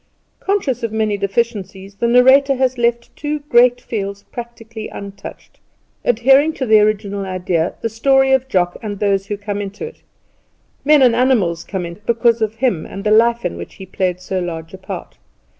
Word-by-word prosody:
Conscious 370 - -1
of 230 -2 -2
many 215 -1 0
deficiencies 200 -1 -3
the 235 +4 -1
narrator 260 +3 +5
had 260 0 +1
left 235 0 0
two 300 +1 -3
great 245 -3 +4
fields 200 -4 -5
practically 230 -2 -8
untouched, 200 0 -10 0.4
adhering 270 +6 +4
to 265 - -3
the 220 -2 +6
original 205 -1 0
idea 180 -3 -1
the - - 0
story 270 +4 +2
of 265 -1 +2
Jock; 180 -6 0
and 205 -2 -5
those 195 -1 0
who 205 - -3
come 205 0 -4
into 200 0 -6
it, 460 - -11 0.8
men 295 -1 +5
and 240 -2 +5
animals, 230 -10 +2
come 190 -3 -4
in 170 +4 -9
because 235 0 +2
of 220 0 -1
him 230 -9 0
and 195 - -8
the 210 - +1
life 235 +2 +4
in 85 - -2
which 85 - -9
he 190 - -10
played 185 -1 -2
so 185 +1 -3
large 165 -2 -5
a 190 - -9
part. 190 - -8
220 Hz, 180 wpm, -18 LUFS, 195-245 Hz, 0.8 s, the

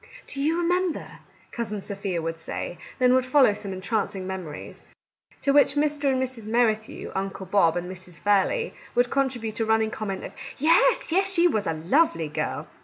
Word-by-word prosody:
"Do 275 - -4
you 315 +4 +1
remember 355 -1 -1
— - - -30
" - - -31
Cousin 215 -3 -3
Sophia 195 -4 -4
would 165 0 -3
say; 165 +1 -5 0.2
then 250 -1 +4
would 260 0 +4
follow 255 -3 +4
some 200 -1 -6
entrancing 195 0 -2
memories, 185 -5 -7 0.6
to 280 - +2
which 285 -1 +5
Mr. 295 0 0
and 260 - +1
Mrs. 250 -4 -4
Merrithew, 220 -1 0
Uncle 195 0 -4
Bob, 175 -3 +3
and 175 0 -3
Mrs. 180 -3 -8
Fairley 205 - +1 0.2
would 245 0 +2
contribute 245 -5 -1
a 225 - +1
running 220 0 +2
comment 195 -3 -4
of - - -7 0.2
" - - -17
Yes, 340 +3 +4
yes! 385 +3 +3
she 350 -2 +4
was 215 - 0
a 165 - +1
lovely 170 - +2
girl 150 - -3
220 Hz, 185 wpm, -25 LUFS, 190-275 Hz, 0.6 s, which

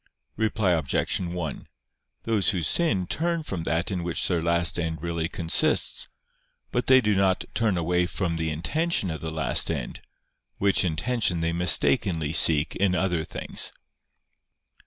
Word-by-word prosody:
Reply 110 -3 0
Obj. 80 -6 0
1: 85 -4 -5 0.6
Those 110 -4 +1
who 90 -4 0
sin 100 - +1
turn 170 - -2
from 90 - -5
that 85 +5 -1
in 90 -2 -3
which 85 -1 0
their 85 -3 0
last 85 0 +1
end 80 -1 -3
really 85 0 -3
consists: 85 -3 +2 0.6
but 125 -1 -2
they 130 0 +6
do 105 -3 +1
not 95 -1 +1
turn 110 -6 0
away 90 +1 0
from 90 -3 -3
the 80 0 -2
intention 100 - -1
of 80 - -6
the 80 - -4
last 75 -6 0
end, - - -4 0.6
which 100 -1 +2
intention 90 +1 0
they 85 0 -1
mistakenly 85 -2 +2
seek 80 -1 +4
in 95 -2 +1
other 90 -4 0
things. - - -2
90 Hz, 150 wpm, -25 LUFS, 80-100 Hz, 0.6 s, they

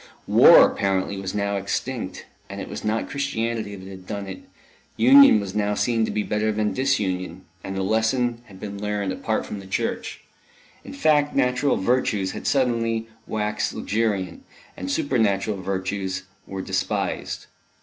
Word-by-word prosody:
War, - - +8
apparently, 95 0 -1
was 95 +1 -4
now 100 0 0
extinct, 115 +5 -4 0.2
and - - -6
it - - -5
was 70 - -7
not 110 +1 -1
Christianity 115 -7 -2
that 95 -1 -10
had 95 -1 -11
done 100 -1 -4
it; 95 -1 -7 0.6
union 130 0 +8
was 100 -2 -5
now 105 0 0
seen 115 0 +1
to - - -4
be 105 - -1
better 105 +1 0
than 105 0 0
disunion, 95 -9 -1 0.2
and 95 - -5
the 95 - -1
lesson 115 +3 +1
had 95 -4 -14
been 100 -1 -6
learned 105 -2 -1
apart 110 +3 -2
from 105 - -6
the 95 - -11
Church. 230 - -3 0.6
In - - -9
fact, 150 - +2
natural 125 +1 +2
virtues 105 -3 +1
had - - -6
suddenly 115 -4 +1 0.2
waxed 105 0 -2
luxuriant, 100 -5 -1 0.3
and 95 - -5
supernatural 105 -4 0
virtues 95 0 -3 0.2
were 95 -1 -5
despised. 95 +1 -2
105 Hz, 155 wpm, -24 LUFS, 95-115 Hz, 0.6 s, War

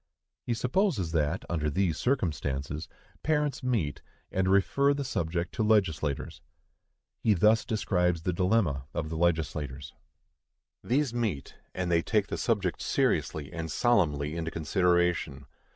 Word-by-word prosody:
He 120 - +1
supposes 125 - 0
that, 80 +2 0
under 75 -3 -1
these 85 +1 +1
circumstances, 75 - -2 0.3
parents 150 -3 0
meet 110 - -1 0.3
and 95 0 +1
refer 140 +9 +3
the 140 - -2
subject 85 -7 -2
to - - 0
legislators. 80 -10 0 0.8
He 110 -2 +3
thus 105 +5 +4
describes 90 -6 0
the 90 - 0
dilemma 90 - +1
of 80 - -2
the 80 - -4
legislators: 75 -5 -1 0.9
These 130 0 +1
meet, 110 - -2 0.2
and 90 -1 -1
they 85 -1 +4
take 105 +1 0
the - - -3
subject 100 -6 0
seriously 75 -2 0
and 80 -2 -4
solemnly 75 - +2
into 80 -1 -2
consideration. 85 -4 +1
90 Hz, 130 wpm, -29 LUFS, 75-110 Hz, 0.9 s, thus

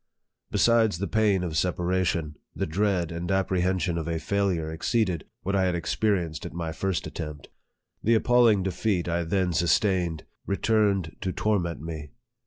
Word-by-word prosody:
Besides 115 -5 +3
the 100 - -2
pain 105 -4 +2
of 85 -3 -3
separation, 90 -2 0 0.2
the - - -1
dreaa 90 0 0
and 85 +2 -3
apprehension 95 -2 +1
of 80 - -4
a 85 -1 -1
failure 90 -3 0
exceeded 90 +1 0 0.2
what 100 +2 -1
I 95 -1 +3
had 90 -1 +1
experienced 85 -2 -1
at - - -7
my 85 -1 -3
first 95 +2 -2
attempt. 75 -3 -7 0.5
The 115 +2 +3
appalling 115 -4 +4
de 95 - -1
feat 95 -4 -1
I 85 0 0
then 90 0 0
sustained 85 0 +1 0.2
returned 100 -4 +1
to 95 - -1
torment 90 -6 -1
me. 80 -2 -6
90 Hz, 155 wpm, -26 LUFS, 85-100 Hz, 0.5 s, appalling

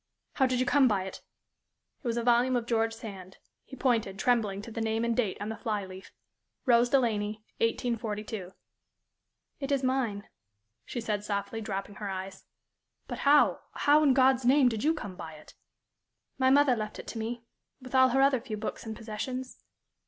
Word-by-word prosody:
"How 265 - +3
did 255 -1 0
you 255 - +2
come 280 -2 +4
by 200 -5 +1
it?" 190 - -8 0.8
It 255 - -6
was 235 0 0
a 235 - 0
volume 245 +2 +3
of 240 -2 0
George 225 -1 0
Sand. 195 -4 -9 0.3
He 265 - -11
pointed, 230 -7 0
trembling, 210 -4 +1
to 230 - -9
the 225 - -4
name 225 +1 0
and 235 -1 0
date 220 -6 0
on 205 +1 -4
the 220 - -3
fly 210 -3 -2
leaf 190 0 -11 0.5
"Rose 240 -1 +4
Delaney, 215 -5 +1 0.2
1842." 220 -4 -2 1.1
"It 275 0 -4
is 275 -1 +1
mine," 250 -6 -1 0.6
she 240 - -4
said, 210 -2 -2
softly, 205 +2 -3
dropping 195 -1 -5
her 205 -2 -4
eyes. 190 0 -6 0.6
"But - - -5
how 295 0 +5
how, 295 +1 +4
in 280 -4 +4
God's 260 -1 +4
name, 260 +1 +5
did 225 -1 -3
you 320 +2 +3
come 195 - -7
by 165 -3 -8
it?" 155 0 -14 0.9
"My 260 0 +4
mother 275 -1 +5
left 215 -2 -5
it - - -8
to 230 - -5
me, 230 +2 -4 0.4
with 255 -1 -12
all 260 0 +6
her 270 +2 +2
other 270 -3 +3
few 215 -2 -5
books 220 +1 -5
and 220 - -4
possessions." 250 +4 -6
230 Hz, 185 wpm, -29 LUFS, 210-255 Hz, 1.1 s, all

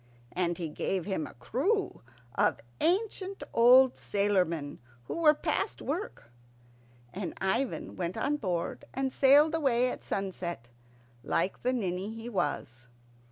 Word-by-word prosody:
And 175 -2 -1
he 170 - -3
gave 180 +4 -2
him 190 -6 -2
a - - -13
crew 295 - -1 0.3
of - - +2 0.2
ancient 390 +2 0
old 250 +2 +6
sailormen 180 -8 0 0.2
who 120 - -5
were 305 -2 +6
past - - -1
work; 300 - -5 0.8
and 185 -3 -5
Ivan 230 +7 -1
went 180 +2 -3
on 285 +6 0
board 180 -9 -3
and 265 0 -1
sailed 290 +3 +6
away 255 -6 +2
at - - -8
sunset, 175 -10 -4 0.5
like 190 - -1
the 250 - +1
ninny 195 -5 -2
he 225 +1 -7
was. 125 - -3
210 Hz, 130 wpm, -30 LUFS, 175-270 Hz, 0.8 s, old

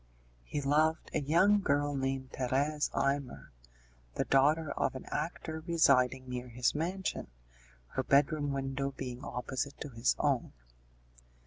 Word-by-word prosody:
He 145 - -3
loved 155 +3 +2
a - - +1
young 185 +8 +4
girl 145 -3 +1
named 135 -1 -2
Thérèse 140 +4 0
Imer, 140 -1 -1 0.6
the - - 0
daughter 145 +3 +3
of - - -1
an 130 - -7
actor 160 0 -3
residing 130 -6 +3
near 125 0 -5
his 120 +1 +1
mansion, 180 +5 -2 0.6
her - - -1
bedroom 145 +2 +2
window 135 0 -2
being 125 0 -6
opposite 130 +2 -4
to 145 - -5
his 120 -1 +1
own. 140 -5 0
140 Hz, 130 wpm, -32 LUFS, 130-150 Hz, 0.6 s, young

